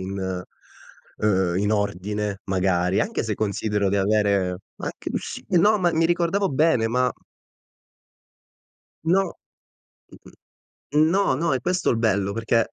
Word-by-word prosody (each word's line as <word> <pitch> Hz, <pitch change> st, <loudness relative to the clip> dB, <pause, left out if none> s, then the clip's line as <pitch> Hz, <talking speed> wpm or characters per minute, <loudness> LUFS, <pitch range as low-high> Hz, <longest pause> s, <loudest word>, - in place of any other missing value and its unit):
in 95 Hz, +1 st, -5 dB, 1.0 s
ehm, 95 Hz, -4 st, +1 dB
in 105 Hz, +1 st, 0 dB
ordine, 100 Hz, 0 st, -2 dB
magari, 95 Hz, -1 st, +1 dB
anche 225 Hz, -, -1 dB
se 110 Hz, -2 st, -2 dB
considero 105 Hz, 0 st, -1 dB
di 100 Hz, -, +1 dB
avere 100 Hz, -2 st, +1 dB, 0.2 s
anche -, -, -5 dB
s -, -, -5 dB
no, 205 Hz, +4 st, +4 dB
ma 175 Hz, -2 st, +2 dB
mi 165 Hz, +1 st, +2 dB
ricordavo 175 Hz, +3 st, +1 dB
bene, 135 Hz, -5 st, +2 dB
ma 125 Hz, +2 st, +1 dB, 1.9 s
No. 185 Hz, +3 st, +1 dB, 0.7 s
Mh-mh. -, -, -16 dB, 0.6 s
No, 165 Hz, +6 st, +3 dB
no, 160 Hz, +1 st, 0 dB
è 130 Hz, -, -1 dB
questo 180 Hz, +6 st, 0 dB
il -, -, +1 dB
bello 100 Hz, -3 st, +1 dB
perché 115 Hz, +1 st, 0 dB
110 Hz, 125 wpm, -23 LUFS, 100-165 Hz, 1.9 s, no